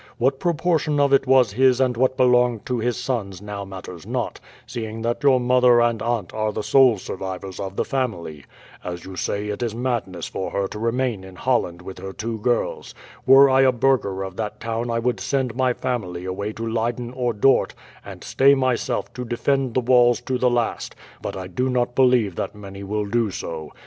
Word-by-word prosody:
What 135 +3 +1
proportion 160 -3 +1
of 140 -1 +3
it 135 -1 +3
was 130 -4 +5
his 130 +2 +4
and 130 -2 +2
what 130 +2 +1
belonged 125 -3 +3
to 125 -2 -2
his 120 +1 -1
sons 115 -7 -3
now 105 0 -6
matters 95 -3 -9
not, - - -3 0.3
seeing 110 -1 -6
that 120 +1 -1
your 135 -3 +4
mother 125 -1 +4
and 120 -2 +1
aunt 115 -6 -2
are 110 0 -1
the 105 - -4
sole 130 -3 +5
survivors 95 0 -6
of 95 -1 -5
the - - -1
family. 85 - -3 0.4
As 90 -1 -6
you 95 0 -8
say, 100 +3 -2
it 105 +3 -4
is 115 -2 -2
madness 115 -8 -2
for 95 - -4
her 100 -1 -1
to 105 - -7
remain 115 -2 -1
in 95 -1 -12
Holland 90 -7 -1
with 95 0 -9
her 95 0 -7
two 110 +2 -4
girls. 120 +3 -1 0.3
Were 135 +1 +8
I 135 0 +4
a 130 -1 +5
burgher 120 -7 +1
of 95 -1 -7
that 105 -2 -4
town 115 +1 -3
I 115 - 0
would 120 +1 -1
send 130 -4 -1
my 130 0 +2
family 95 -9 -3
away 100 +3 -3
to 115 - -5
Leyden 120 +2 -2
or 125 -2 -1
Dort 115 +5 +2 0.3
and - - -10
stay 140 +1 +4
myself 130 -2 -1
to 125 - -5
defend 125 +2 -1
the 130 - +3
walls 120 -1 +4
to 130 -1 -2
the 125 - +3
last, 120 -1 -2 0.3
but - - -5
I 95 - -5
do 125 +8 -2
not 120 -1 0
believe 125 -6 +3
that - - -3
many 100 -1 -10
will 105 +1 -2
do 115 +1 0
so. 80 -5 -6
120 Hz, 205 wpm, -22 LUFS, 100-130 Hz, 0.4 s, Were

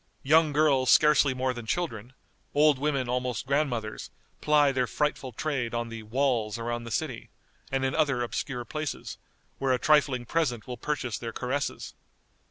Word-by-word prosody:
Young 155 +2 +4
girls 140 -3 +3
scarcely 150 -3 +5
more 130 0 0
than 120 -2 -8
children, 125 -9 -3 0.4
old 150 -2 +5
women 140 -3 0
almost 125 -1 -2
grandmothers, 130 -6 -1 0.3
ply 150 -2 +4
their 130 -2 0
frightful 150 -2 -1
trade 125 -2 -2
on 120 0 -2
the 115 -1 -7
"walls" 115 -1 0
around 120 0 -3
the - - -6
city, 125 +1 -3 0.4
and 135 0 0
in 130 - 0
other 140 -6 +1
obscure 120 +1 -4
places, 155 +1 -5 0.4
where 135 -1 +2
a - - +2
trifling 140 -3 +3
present 125 -6 -1
will 125 - -5
purchase 125 -2 -3
their 115 -1 -5
caresses. 130 +5 -3
130 Hz, 160 wpm, -28 LUFS, 120-150 Hz, 0.4 s, scarcely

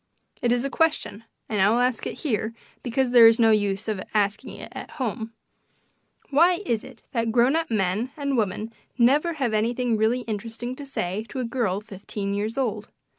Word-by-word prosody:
It 240 - +2
is 245 0 +2
a - - -1
question, 290 -9 0 0.2
and 210 -3 0
I 195 - +5
will 225 - +3
ask 245 -1 +1
it - - -7
here 230 -5 -1 0.3
because 250 +1 0
there 235 -2 +9
is 225 0 +5
no 225 -1 +5
use 205 -1 +1
of 210 -3 -2
asking 205 -1 0
it - - -8
at - - -8
home: 225 -2 -3 1.0
Why 345 +6 +4
is 230 -8 0
it - - -13
that 230 -2 0
grown 245 +5 +4
up 330 0 0
men 210 +2 0
and 280 -2 -1
women 215 0 -1 0.2
never 285 +8 +4
have 265 -8 -1
anything 235 +2 +1
really 225 +4 +2
interesting 230 +2 -5
to 285 - -8
say 200 -5 -2
to 265 - -5
a 250 - -1
girl 230 -5 -1
fifteen 200 -1 -5
years 215 +4 -2
old? 215 -6 -1
230 Hz, 190 wpm, -25 LUFS, 210-255 Hz, 1.0 s, there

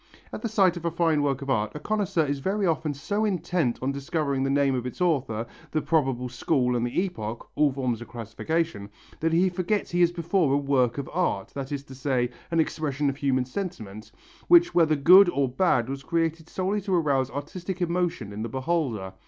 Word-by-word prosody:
At - - -5
the 230 - -2
sight 190 -5 +3
of 170 - -7
a - - +2
fine 165 -2 +1
work 140 -1 0
of 135 - -7
art, 105 -3 0
a - - -4
connoisseur 190 -2 0
is 140 0 -2
very 195 +7 -1
often 160 -3 0
so 205 +9 -2
intent 175 - 0
upon 130 +2 -2
discovering 140 0 -2
the 135 - 0
name 140 -1 +2
of 125 -1 -2
its 125 - -8
author, 135 -11 0 0.2
the 155 - -1
probable 135 -6 +1
school 125 0 0
and 120 - 0
the 120 - 0
epoch 115 - -6
all 150 -2 +3
forms 130 -4 -2
of 120 - -8
classification 120 +1 -3 0.3
that 165 +1 +1
he 175 +3 +4
forgets 185 +3 -1
he 175 0 +1
is 175 -1 +5
before 170 -4 +1
a - - +3
work 135 -4 +1
of 140 - -4
art, 165 - 0
that 135 0 -6
is 140 -1 -3
to 135 - -12
say, 130 -2 -1 0.2
an 165 -1 0
expression 145 -3 0
of 135 - -11
human 130 -3 +1
sentiment, 125 - -6 0.4
which 345 0 +6
whether 160 -3 +4
good 180 +6 +7
or 140 -5 +1
bad 130 -3 +1
was 135 +1 -5
created 165 +2 -1
solely 195 +3 -1
to 190 -1 0
arouse 140 -6 +1
artistic 170 +7 -5
emotion 170 - -1
in 105 - -5
the 115 - -3
beholder. 130 - -2
145 Hz, 210 wpm, -26 LUFS, 130-175 Hz, 0.4 s, good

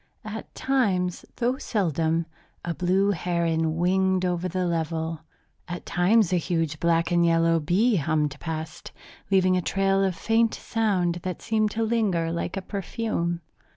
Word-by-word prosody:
At 215 +1 -7
times, 195 -10 0
though 250 +2 0
seldom, 165 - 0 0.4
a 170 - -1
blue 185 +5 +2
heron 165 -3 0
winged 185 +1 +2
over 180 0 -1
the 185 +1 -1
level. 165 -1 -2 0.5
At 175 +1 -6
times 185 +2 +3
a - - +4
huge 165 -3 -1
black 170 0 +2
and 175 0 +3
yellow 165 0 +3
bee 195 +9 +2
hummed 150 -2 0
past, 160 -1 -6 0.4
leaving 185 -2 +4
a 180 - +1
trail 195 +2 +1
of 190 -2 0
faint 225 +3 +2
sound 185 -6 0
that 185 0 -5
seemed 215 -1 +1
to 225 - +2
linger 205 -8 +1
like 170 +3 -3
a 195 - -4
perfume. 190 -3 -2
180 Hz, 150 wpm, -25 LUFS, 165-195 Hz, 0.5 s, a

